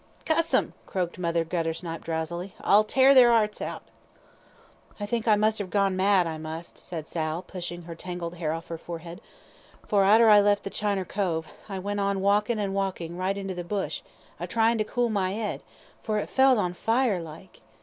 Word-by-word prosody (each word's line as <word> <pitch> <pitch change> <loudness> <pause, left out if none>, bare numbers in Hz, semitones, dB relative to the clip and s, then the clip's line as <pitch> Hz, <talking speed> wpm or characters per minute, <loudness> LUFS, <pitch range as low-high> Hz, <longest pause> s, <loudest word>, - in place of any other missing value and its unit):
"Cuss 330 +1 +2
'em!" - - +1
croaked 180 -1 -3
Mother 170 -1 0
Guttersnipe, 165 0 -3
drowsily, 170 +3 -4
"I'll 205 +2 +5
tear 265 +5 +5
their 250 -3 +8
'earts 215 -3 +2
out." - - -5 1.2
"I 205 - -2
think 230 +2 -2
I 215 - +6
must 215 +1 +1
have 200 -3 -4
gone 195 -1 +1
mad, 190 -1 +3
I 160 -1 -4
must," 160 +2 -7
said 160 -3 -7
Sal, 160 +1 -3
pushing 175 -2 -6
her 165 0 -8
tangled 175 0 -6
hair 160 -3 -1
off 165 +1 -6
her 165 -1 -5
forehead, 170 +2 -8 0.6
"for 205 -3 +3
arter 220 +4 +6
I 210 -1 +8
left 205 0 +2
the 195 - -5
Chiner 200 -3 -1
cove, 175 -5 -1 0.2
I 195 - -4
went 205 +2 -3
on 200 -1 0
walkin' 210 +4 +2
and 200 -2 -2
walkin' 190 -4 -3
right 185 +2 -1
into 195 -1 -4
the 175 -1 -5
bush, 195 +3 -3 0.4
a - - -4
tryin' 225 0 +2
to - - +3
cool 240 +2 -1
my 195 -2 0
'ead, 215 -1 -3 0.4
for 215 -2 -1
it 210 - -3
felt 265 -1 +5
on 180 -4 0
fire 225 -1 +1
like. 165 +3 -12
195 Hz, 195 wpm, -26 LUFS, 170-210 Hz, 1.2 s, their